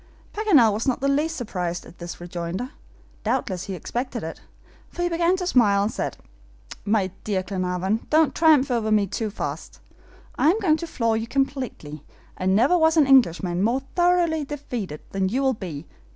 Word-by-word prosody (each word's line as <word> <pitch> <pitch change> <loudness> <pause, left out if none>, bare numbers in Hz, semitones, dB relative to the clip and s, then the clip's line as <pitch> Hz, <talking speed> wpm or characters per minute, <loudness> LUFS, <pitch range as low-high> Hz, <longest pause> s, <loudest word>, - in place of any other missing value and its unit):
Paganel 315 - +4
was 220 +5 -3
not 260 - +1
the 275 - 0
least 300 +4 +1
surprised 180 - -4
at 175 - -15
this 175 0 -7
rejoinder. 175 - -5 0.5
Doubtless 185 -2 -1
he 195 - -5
expected 240 +5 -4
it, 160 0 -7 0.5
for 350 - -4
he 350 - +1
began 340 +2 +2
to 365 - -3
smile, 210 - +3
and 210 - -1
said: - - -4 0.7
"My 205 -3 +1
dear 195 -3 -1
Glenarvan, 185 +2 -2
don't 310 -3 +3
triumph 305 -5 +4
over 225 -3 0
me 210 -1 +4
too 215 +3 -3
fast. 205 - -6 0.6
I 305 - +5
am 395 +6 +2
going 325 -7 +3
to 335 - -6
floor 230 -7 0
you 225 +1 -2
completely, 255 - -3 0.3
and 190 +1 +1
never 255 - +4
was 320 -1 +3
an 305 - +6
Englishman 185 -9 +3
more 235 +6 +1
thoroughly 350 -3 +2
defeated 245 - -5
than 190 -1 0
you 260 +6 0
will 265 -1 +3
be. 170 - -7
230 Hz, 180 wpm, -24 LUFS, 190-295 Hz, 0.7 s, an